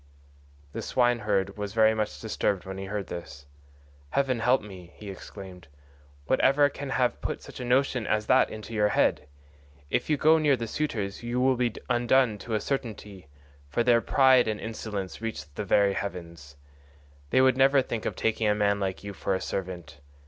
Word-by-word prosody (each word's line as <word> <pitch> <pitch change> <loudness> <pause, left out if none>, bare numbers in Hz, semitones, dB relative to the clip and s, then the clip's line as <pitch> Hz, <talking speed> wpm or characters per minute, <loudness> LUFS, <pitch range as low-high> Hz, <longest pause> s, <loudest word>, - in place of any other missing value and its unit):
The - - -4
swineherd 105 -6 +1
was 105 0 -5
very 110 -1 +5
much 110 -1 -3
disturbed 100 -4 -1
when 95 0 -6
he 95 - -5
heard 100 0 -4
this. 80 -4 -8 0.6
"Heaven 130 - 0
help 125 +3 +2
me," 90 -4 -11
he 105 -2 -8
exclaimed, 95 -3 -11 0.6
"what 130 - +1
ever 145 +1 +4
can 140 0 -7
have 125 -2 0
put - - -4
such - - -11
a - - -4
notion 125 -1 +1
as 105 0 0
that - - +4
into 110 +1 -8
your 105 -1 +3
head? - - +1 0.6
If - - 0
you 150 - +2
go 160 +2 +5
near 145 -4 +3
the 115 - -3
suitors 110 -8 -3
you 120 +1 -2
will 130 +1 +3
be 120 -2 -1
undone 120 -2 +2
to 110 +3 -4
a - - +1
certainty, 105 - -5 0.4
for 120 - 0
their 120 -1 +4
pride 130 0 +4
and 105 -1 -2
insolence 105 -4 -5
reach 115 -8 -5
the 105 - -4
very 100 +1 +3
heavens. 85 -7 -6 0.7
They - - +3
would 130 -1 +5
never 135 +1 +4
think 115 -3 -4
of - - -3
taking 110 0 0
a 105 - +3
man 100 -1 +1
like 95 -1 -3
you 100 0 -6
for 95 - -1
a - - -2
servant. 90 -6 -5
110 Hz, 185 wpm, -27 LUFS, 100-125 Hz, 0.7 s, very